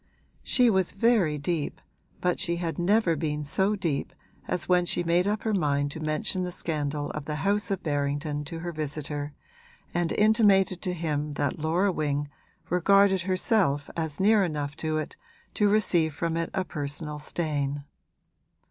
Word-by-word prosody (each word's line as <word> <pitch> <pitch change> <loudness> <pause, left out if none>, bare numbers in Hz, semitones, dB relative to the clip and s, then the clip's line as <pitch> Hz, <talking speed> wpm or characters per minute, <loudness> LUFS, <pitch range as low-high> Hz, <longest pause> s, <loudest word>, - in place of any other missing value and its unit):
She 245 -2 +3
was 190 -3 +2
very 195 -8 +2
deep, 150 +1 -2 0.4
but 180 -1 +1
she 170 -2 0
had 170 -2 -3
never 185 -1 +3
been 150 -1 -2
so 190 +8 +1
deep 165 -8 -2 0.3
as 170 -1 -2
when 180 -1 +4
she 175 - 0
made 175 +2 +2
up 210 0 -1
her 220 - 0
mind 145 -6 +1
to 160 - -7
mention 155 +4 -1
the 180 0 -2
scandal 150 -4 -2
of 150 -1 -6
the 150 - -3
house 205 +1 +2
of 195 -2 -2
Berrington 145 0 -1
to 165 +2 -6
her 175 0 -4
visitor 150 -1 -4 0.6
and 175 -1 0
intimated 205 -4 +4
to 180 - -2
him 150 -3 -2
that 145 0 -1
Laura 170 +6 +1
Wing 145 -3 -1 0.4
regarded 190 +1 +4
herself 185 - +1
as 160 -3 -3
near 205 +1 +5
enough 145 -4 -3
to 155 -1 -1
it 155 - -5 0.4
to 205 -1 +3
receive 175 -7 +2
from 165 0 -1
it 165 0 -1
a 185 - -1
personal 150 0 -3
stain. 145 -3 -2
165 Hz, 165 wpm, -27 LUFS, 150-190 Hz, 0.6 s, near